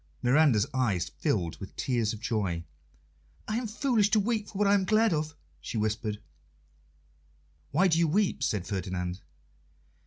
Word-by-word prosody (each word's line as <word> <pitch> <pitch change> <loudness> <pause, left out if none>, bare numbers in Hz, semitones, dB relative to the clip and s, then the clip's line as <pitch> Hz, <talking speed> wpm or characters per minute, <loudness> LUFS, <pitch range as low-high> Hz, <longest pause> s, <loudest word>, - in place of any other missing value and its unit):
Miranda's 125 -4 +4
eyes 105 -10 0
filled 85 -2 -2
with 95 - -9
tears 120 -4 0
of 110 - -6
joy. 100 -7 -1 0.8
"I 215 - -1
am 240 -1 -2
foolish 220 -2 +2
to 215 - +4
weep 215 0 -1
for 195 - -8
what 205 0 +3
I 200 - +5
am 200 -2 +3
glad 215 +1 +3
of," 155 0 -2 0.2
she - - -5
whispered. 105 0 -1 1.5
"Why 180 +7 +3
do 165 -2 +2
you 170 - +4
weep?" 195 +5 +1
said 100 -4 0
Ferdinand. 90 -1 -3
130 Hz, 155 wpm, -29 LUFS, -, 1.5 s, I